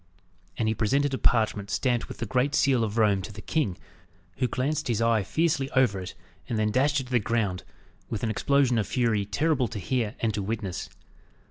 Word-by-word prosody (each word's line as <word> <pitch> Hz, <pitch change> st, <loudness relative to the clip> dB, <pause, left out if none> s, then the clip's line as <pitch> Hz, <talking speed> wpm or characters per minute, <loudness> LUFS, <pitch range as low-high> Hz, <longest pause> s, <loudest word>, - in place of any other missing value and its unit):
And 110 Hz, -, 0 dB
he 110 Hz, -, +2 dB
presented 135 Hz, +6 st, +1 dB
a 130 Hz, -, -1 dB
parchment, 110 Hz, -3 st, +2 dB
stamped 120 Hz, -3 st, 0 dB
with -, -, -9 dB
the 115 Hz, -, -3 dB
great 130 Hz, +6 st, +1 dB
seal 130 Hz, -4 st, +3 dB
of 110 Hz, 0 st, -3 dB
Rome, 105 Hz, -3 st, +3 dB
to 100 Hz, -, -7 dB
the 105 Hz, -, -10 dB
king, 105 Hz, -, -1 dB, 0.6 s
who 130 Hz, -, +1 dB
glanced 135 Hz, +5 st, -1 dB
his 115 Hz, -3 st, 0 dB
eye 115 Hz, -1 st, +3 dB
fiercely 140 Hz, -, 0 dB
over 120 Hz, -7 st, +3 dB
it, 90 Hz, -, -7 dB, 0.3 s
and 115 Hz, -, -1 dB
then 105 Hz, 0 st, +1 dB
dashed 140 Hz, +4 st, +2 dB
it -, -, -3 dB
to 125 Hz, -, -13 dB
the 125 Hz, -, +4 dB
ground, 105 Hz, -4 st, -1 dB, 0.5 s
with 110 Hz, -, -4 dB
an 110 Hz, -, +1 dB
explosion 130 Hz, +1 st, +2 dB
of 105 Hz, -, -1 dB
fury 115 Hz, -5 st, +1 dB
terrible 140 Hz, +4 st, +1 dB
to 105 Hz, -, -7 dB
hear 110 Hz, +3 st, -1 dB
and 115 Hz, -2 st, 0 dB
to 105 Hz, -, -2 dB
witness. 100 Hz, -3 st, -4 dB
115 Hz, 210 wpm, -27 LUFS, 105-130 Hz, 0.6 s, the